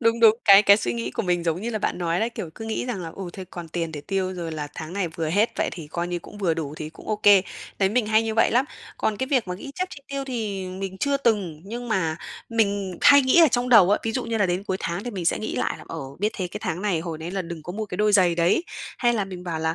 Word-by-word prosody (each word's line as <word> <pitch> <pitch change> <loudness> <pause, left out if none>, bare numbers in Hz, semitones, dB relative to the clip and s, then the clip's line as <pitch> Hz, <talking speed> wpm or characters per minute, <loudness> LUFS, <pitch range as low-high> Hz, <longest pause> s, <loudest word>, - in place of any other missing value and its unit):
Đúng, 230 -1 +2
đúng, 225 -1 +7
cái 200 0 +9
cái 200 0 +7
suy 120 - -2
nghĩ 115 +1 -3
của - - -2
mình 175 -2 0
giống 165 +1 0
như 235 - -2
là 220 - -2
bạn 200 - -2
nói 170 0 0
đấy, 230 +2 0
kiểu, 175 -8 -6
cứ 225 - -8
nghĩ 225 +2 -3
rằng 235 -6 -3
là, 170 - -5
ừ, 195 - -5
thôi 190 - -7
còn 170 -2 -8
tiền 165 0 -3
để 150 - -5
tiêu 190 +3 -2
rồi 170 -2 -5
là 150 -2 -4
tháng 160 +1 -7
này 195 -3 -1
vừa 165 -1 -3
hết, 205 +8 +2
vậy - - 0
thì 165 -4 -7
coi 170 +3 -3
như 175 0 -2
cũng 205 - -13
vừa 175 -5 +1
đủ 155 -2 -4
thì 155 0 -6
cũng 160 - -14
ô 215 - +1
kê. 205 -2 +6 0.4
Đấy, 195 - +3
mình 225 +1 +1
hay 220 +1 +4
như 225 -1 -2
vậy 225 - +4
lắm. 250 +3 +3 0.3
Còn 215 - 0
cái 260 - -2
việc 255 -8 +1
mà 180 - -2
ghi 275 +9 -8
chép 370 0 -2
chi 285 - -10
tiêu 275 -1 -3
thì 215 -7 -3
mình 190 0 -5
chưa 280 0 +1
từng, 205 - 0
nhưng 240 +4 -6
mà 165 -8 0 0.3
mình 200 -5 0
hay 285 0 +8
nghĩ 260 +6 +5
ở 325 - +7
trong 245 0 0
đầu 210 -6 +7
á, 205 - +4
ví 225 - -2
dụ - - -2
như 230 -1 -2
là 205 - +3
đến 180 +2 -1
cuối 190 -2 -1
tháng 170 +5 -3
thì 245 - -3
mình 185 -6 -5
sẽ - - +2
nghĩ 215 - -4
lại - - -1
là - - -12
"Ờ, 165 - -5 0.2
biết 210 +2 0
thế 185 - -2
cái 210 - -7
tháng 180 -2 -3
này 195 -6 +1
hồi 165 -2 -5
đấy 165 +2 -6
là 190 -1 -2
đừng 165 -2 -7
có 175 - -6
mua 215 +3 -3
cái 180 - -6
đôi 210 +1 +2
giày 180 -4 +5
đấy", 175 - +2 0.3
hay 240 -1 +3
là 210 -4 0
mình 185 -2 -8
bảo 170 -3 -3
là 160 +1 0
195 Hz, 315 wpm, -24 LUFS, 170-225 Hz, 0.4 s, cái